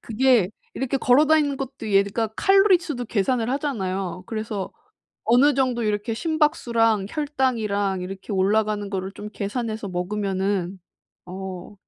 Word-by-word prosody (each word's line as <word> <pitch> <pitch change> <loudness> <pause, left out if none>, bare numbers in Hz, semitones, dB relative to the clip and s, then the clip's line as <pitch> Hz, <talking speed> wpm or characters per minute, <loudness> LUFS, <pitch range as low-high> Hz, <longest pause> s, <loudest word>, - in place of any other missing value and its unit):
그게 235 -4 +2 0.2
이렇게 265 +1 -1
걸어 265 +4 +4
다니는 295 -3 +3
것도 260 -5 -6
얘가 200 +3 +2
칼로리 390 -1 +5
수도 295 -8 -5
계산을 230 +2 0
하잖아요. 190 - -2
그래서 215 -3 -4 0.5
어느 255 +5 +5
정도 255 -3 +1
이렇게 210 +1 -1
심박수랑 235 - +1
혈당이랑 225 -10 -1
이렇게 190 +3 -7
올라가는 205 +1 +1
거를 190 0 -3
좀 210 +1 -8
계산해서 215 0 -4
먹으면은 190 0 -2 0.5
어 185 +1 -7
220 Hz, 320 characters per minute, -23 LUFS, 195-260 Hz, 0.5 s, 칼로리